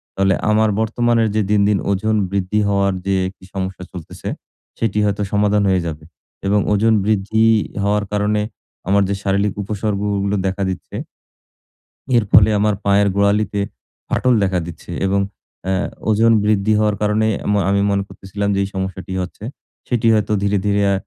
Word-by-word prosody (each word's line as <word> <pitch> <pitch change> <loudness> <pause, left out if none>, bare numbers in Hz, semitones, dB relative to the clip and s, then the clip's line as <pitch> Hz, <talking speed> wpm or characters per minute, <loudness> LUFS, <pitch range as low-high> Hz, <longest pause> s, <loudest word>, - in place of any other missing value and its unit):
তাহলে 95 0 +2 0.2
আমার 110 0 +3
বর্তমানের 115 0 +1
যে 110 - +3
দিন, 105 -1 +4
দিন 105 -1 +3
ওজন 110 +3 0 0.2
বৃদ্ধি 100 +1 0
হওয়ার 100 -1 +1
যে 100 0 +1
একটি 95 0 -12
সমস্যা 95 -1 -4
চলতেছে, 90 -4 -8 0.5
সেটি 110 -3 -1
হয়তো 100 0 -1
সমাধান 105 0 +2
হয়ে 95 -1 +2
যাবে। 80 -1 -6 0.4
এবং 105 +1 +3
ওজন 110 +2 +3
বৃদ্ধি 110 +1 +1 0.4
হওয়ার 105 +1 +1
কারণে 105 0 +1 0.5
আমার 100 +1 +3
যে 100 - 0
শারীরিক 100 +1 +1
উপসর্গগুলো 100 -1 -1
দেখা 95 +1 -2
দিচ্ছে 95 - -6 1.2
এর 115 - +3
ফলে 105 +2 +7
আমার 105 +1 +2
পায়ের 100 0 +4
গোড়ালিতে 100 0 +1 0.5
ফাটল 125 - +2
দেখা 95 -2 +1
দিচ্ছে 85 0 -9
এবং 100 +1 +1 0.5
অ্যা 95 0 0 0.3
ওজন 110 +2 +4
বৃদ্ধি 105 0 +2
হওয়ার 105 -1 +2
কারণে 105 +1 +2 0.2
আমো 105 0 +2
আমি 100 0 +2
মনে 100 0 +1
করতেছিলাম 100 +1 -4
যে, - - 0
এই - - -2
সমস্যাটি 95 -1 -4
হচ্ছে 90 +3 -8 0.4
সেটি 120 -2 +1
হয়তো 110 -1 +1
ধীরে, 100 0 +2
ধীরে 100 0 +2
আ - - +2
100 Hz, 160 wpm, -19 LUFS, 95-105 Hz, 1.2 s, ফলে